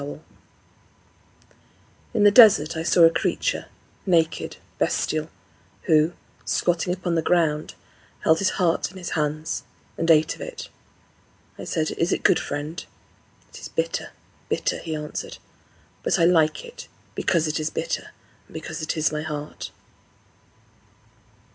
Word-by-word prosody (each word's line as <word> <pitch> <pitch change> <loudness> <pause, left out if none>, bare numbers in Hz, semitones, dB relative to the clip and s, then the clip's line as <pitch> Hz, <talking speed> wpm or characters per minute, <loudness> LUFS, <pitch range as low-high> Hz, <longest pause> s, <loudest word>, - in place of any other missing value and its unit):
III 145 +1 -6 2.0
In 210 - +3
the 205 - +7
desert 200 -9 +7
I 160 - -2
saw 170 +1 +4
a 165 - +8
creature, - - -1 0.4
naked, 165 -4 +1 0.2
bestial, 155 0 0 0.5
who, 160 0 +3 0.3
squatting 175 0 0
upon 180 -1 -2
the 165 - +2
ground, 155 -3 +1 0.5
Held 160 0 +3
his 195 - +2
heart 175 -2 +1
in 190 - -13
his 180 -2 -6
hands, 155 +1 -1 0.4
And 165 - 0
ate 155 -1 +5
of - - -13
it. 480 -1 -7 0.9
I - - -6
said, 155 -2 -1
"Is 170 - +2
it - - -1
good, - - +5
friend?" 150 +4 -4 0.7
"It - - -12
is - - -7
bitter 485 +1 -2 0.4
bitter," - - 0
he 160 -2 -4
answered; 150 0 -5 0.6
"But - - +1
I 165 - +4
like 170 - +3
it 475 0 -10 0.3
Because 165 -3 +1
it 155 - -1
is 155 0 -1
bitter, - - -3 0.4
And - - -18
because - - -6
it 155 +1 -2
is 155 - +2
my 150 0 -2
heart." 150 -1 -6
165 Hz, 140 wpm, -24 LUFS, 155-180 Hz, 2.0 s, a